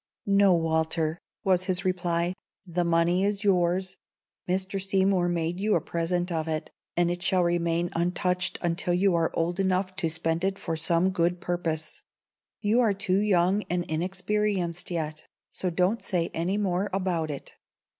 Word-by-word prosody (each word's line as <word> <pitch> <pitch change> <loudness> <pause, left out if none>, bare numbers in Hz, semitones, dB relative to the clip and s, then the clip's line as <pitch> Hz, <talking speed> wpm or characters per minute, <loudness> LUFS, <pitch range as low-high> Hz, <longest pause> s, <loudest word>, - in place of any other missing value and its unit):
"No, 200 -2 +5
Walter," 160 0 0 0.2
was 185 -1 +2
his 185 +1 +1
reply. 175 -1 0 0.3
"The 175 -1 -1
money 170 +2 +2
is 200 0 0
yours. 185 -1 +1 0.5
Mr. 190 +1 0
Seymour 190 -2 +2
made 170 +1 -1
you 210 +2 +2
a - - +3
present 175 +2 -2
of 160 -1 -1
it, 155 -1 -3 0.3
and 175 0 +3
it 175 0 -4
shall 185 -1 +2
remain 170 0 0
untouched 180 +2 0
until 175 +1 0
you 190 +1 +3
are 165 -1 +2
old 175 +3 -1
enough 185 0 0
to 170 -4 0
spend 165 +1 0
it 195 0 0
for 165 -4 -3
some 165 +3 +2
good 175 0 0
purpose. 170 -4 -3 0.6
You 215 +3 +2
are 220 -5 +3
too 195 -1 +1
young 195 -1 +3
and 175 0 0
inexperienced 180 +1 -1
yet; 155 -3 -4 0.2
so 185 - -2
don't 180 +6 +1
say 175 -3 -1
any 175 +5 -1
more 195 -1 0
about 180 -4 -1
it. 140 -2 -7
175 Hz, 160 wpm, -27 LUFS, 170-190 Hz, 0.6 s, No